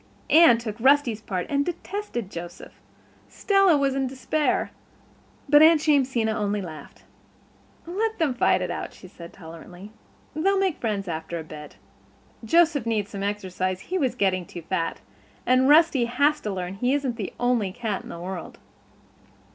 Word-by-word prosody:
Anne 315 -7 +7
took 225 -1 -6
Rusty's 260 -3 +3
part 185 -4 -3
and 280 0 +1
detested 345 - -5
Joseph. 175 +1 -8 0.6
Stella 390 -5 +3
was 275 -1 +1
in 270 -1 -1
despair. 270 +4 -1 0.8
But 295 +1 +6
Aunt 320 0 +7
Jamesina 260 -6 +2
only 210 -1 -1
laughed. 155 -6 -10 0.8
"Let 430 +6 -2
them 315 -6 +1
fight 245 - +2
it - - -3
out," - - -5
she 185 - -13
said 170 -2 -12
tolerantly. 175 +3 -12 0.4
"They'll 390 +6 +1
make 380 -4 0
friends 205 -4 -2
after 160 0 -4
a 160 - -6
bit. 150 -1 -11 0.7
Joseph 305 -1 +3
needs 210 -3 -1
some 200 - -6
exercise—he 190 - -3
was 265 -5 0
getting 185 -3 0
too 175 - -9
fat. 165 -1 -3 0.4
And 255 +2 +3
Rusty 300 -5 +5
has 285 +5 +1
to 210 - -3
learn 185 -1 -4
he 250 +5 +1
isn't 270 -4 -2
the 205 -5 -4
only 245 -6 +1
cat 215 -2 -3
in - - -13
the - - -7
world." 180 0 -7
230 Hz, 155 wpm, -24 LUFS, 185-290 Hz, 0.8 s, Anne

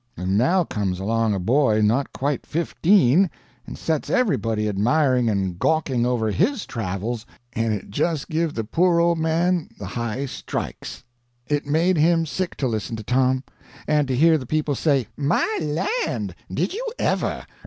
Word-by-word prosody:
And 95 +2 -1
now 175 - +3
comes 100 - -2
along 110 +1 +1
a - - -2
boy 115 +2 +2
not 115 +6 +1
quite 140 +1 -2
fifteen, 170 0 +3 0.4
and - - -7
sets 160 -3 -2
everybody 115 - +1
admiring 125 +4 +2
and 95 -4 -1
gawking 135 -7 +1
over 115 -3 0
his 265 - 0
travels, 110 +1 -4 0.3
and 115 0 0
it 105 -2 -4
just 155 +6 -1
give 160 -1 -1
the 115 - -1
poor 170 +9 +2
old 170 -1 +2
man 165 +2 +1
the 100 - -7
high 115 +6 -3
strikes. 135 - -6 0.4
It 145 0 -1
made 165 +5 +2
him 165 +2 +3
sick 180 +3 -3
to 135 - 0
listen 110 -1 -3
to 110 - -7
Tom, 130 +3 +1 0.4
and 150 -2 +2
to 130 - 0
hear 160 +4 +5
the 130 - -8
people 155 0 0
say 140 -3 +1
"My 145 0 +1 0.5
land!" - - -3 0.2
"Did - - -1
you 455 +5 -4
ever!" - - -1
135 Hz, 165 wpm, -23 LUFS, 110-160 Hz, 0.5 s, hear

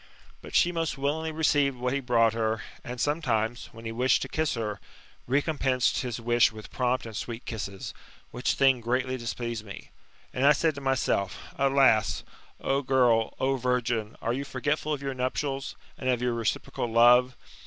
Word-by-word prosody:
But - - -9
she 175 - +4
most 165 -4 -2
willingly 155 +4 -1
received 145 -4 +2
what 125 +1 -1
he 140 - 0
brought 115 -4 +3
her, 110 -1 -1 0.2
and 125 0 -6
sometimes, 120 -7 -1
when 115 0 -12
he 115 - -3
wished 125 +3 +2
to - - -5
kiss 155 -3 -1
her, 105 -3 -3 0.5
recompensed 135 -2 +1
his 125 -3 -3
wish 120 +1 +3
with 110 -1 -11
prompt 125 0 0
and 110 -2 -8
sweet 115 +2 -5
kisses; 100 -4 -5 0.4
which 125 +2 0
thing 135 -3 +4
greatly 130 +2 0
displeased 120 -2 -4
me. 100 -2 -10 0.4
And 130 - -1
I 145 +1 +7
said 160 +2 +1
to 140 - -8
myself: 125 -8 0 0.2
Alas! 135 -6 +3 0.4
O 135 +1 0
girl, 125 -4 +2
O 135 +1 +1
virgin, 120 -3 -1
are 115 - 0
you 135 +3 -2
forgetful 145 +3 -2
of 145 -2 -2
your 135 -1 -2
nuptials, 135 +2 -2 0.2
and 130 - -1
of 125 -2 +2
your 125 0 0
reciprocal 115 +1 -2
love 120 +2 +5
125 Hz, 175 wpm, -27 LUFS, 115-135 Hz, 0.5 s, I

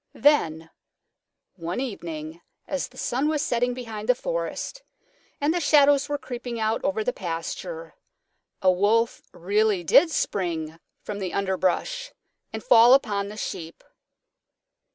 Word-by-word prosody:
Then 165 - +2 0.9
one 170 +4 -4
evening 165 - -6 0.3
as 285 -2 -2
the - - -20
sun 260 +5 0
was 305 -2 0
setting 245 -2 0
behind 225 -3 -7
the 250 - +6
forest - - -4 0.6
and 290 +3 +1
the 350 - 0
shadows 290 -2 +4
were 290 - 0
creeping 245 -3 -6
out 220 +1 0
over 215 +3 0
the 250 - -1
pasture, 190 - -5 0.7
a 185 - +6
Wolf 215 +5 +2
really 200 +1 +1
did 325 - +6
spring 165 - -2 0.2
from 205 -1 -5
the 185 -3 -4
underbrush 200 - -1 0.4
and - - -6
fall 240 - +7
upon 200 -7 0
the 210 +1 -9
Sheep. 170 -6 -6
220 Hz, 135 wpm, -25 LUFS, 185-280 Hz, 0.9 s, fall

